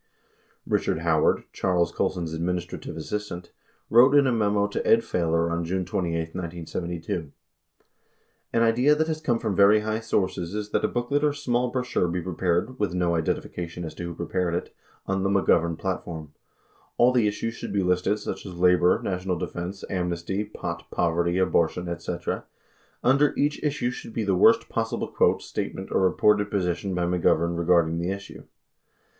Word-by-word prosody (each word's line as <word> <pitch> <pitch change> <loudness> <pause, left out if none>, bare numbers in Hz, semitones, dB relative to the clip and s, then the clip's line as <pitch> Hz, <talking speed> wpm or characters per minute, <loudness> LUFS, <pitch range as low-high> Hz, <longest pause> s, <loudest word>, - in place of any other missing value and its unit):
Eichard 80 - 0
Howard, 80 -2 +2
Charles 90 -2 +1
Colson's 85 -3 -2
administrative 85 0 -3
assistant, 90 +1 -5 0.4
wrote 125 +5 +6
in 145 -1 +6
a 130 - +2
memo 105 -3 +2
to 100 - -3
Ed 225 +1 +5
Failor 85 - 0
on 85 0 -1
June 90 +2 -2
28, 85 -2 -2
1972: 85 -2 -4 1.2
An 115 - +2
idea 125 +6 +4
that 160 +1 +1
has 155 -1 -3
come 125 -7 +1
from 110 -4 -2
very 100 +2 +6
high 110 +1 -1
sources 95 -4 -1
is 105 0 -4
that - - +1
a - - +3
booklet 130 +5 -1
or 150 -1 +3
small 125 -4 0
brochure 125 -7 0
be 90 +1 -2
prepared 90 +6 -1
(with 100 -4 -1
no 90 -1 +1
identification 85 +1 -3
as 80 - -6
to 85 -1 -6
Avho 85 - -10
prepared 85 0 -1
it) 90 - -4 0.3
on 95 0 -1
the 95 - +1
"McGovern 85 -4 +2
Platform.'' 80 -5 -5 0.6
All 120 +1 +5
the 120 -4 +3
issues 105 +2 -2
should - - -7
be 100 -2 +1
listed 90 +3 +1
such 105 - -5
as 95 -3 -8
labor, 90 0 +4
national 90 -1 -2
defense, 90 +4 -5
am 90 -2 -1
nesty, 85 +4 -2
pot, 85 -5 -6
poverty, 85 +1 +1
abortion, 90 -1 +1
etc. 85 0 -4 0.6
Under 140 +3 +3
each 145 +1 0
issue 145 -5 0
should 120 -2 -9
be 115 - -1
the 100 -2 +1
worst 90 - +5
possible - - -2
quote, - - +2
statement, - - -5
or - - +2
reported 105 +2 +3
position 90 -1 -1
by 90 -1 0
McGovern 85 -1 +2
regarding 85 -1 +2
the 85 +2 -2
issue. 100 +1 -7
90 Hz, 170 wpm, -25 LUFS, 85-105 Hz, 1.2 s, wrote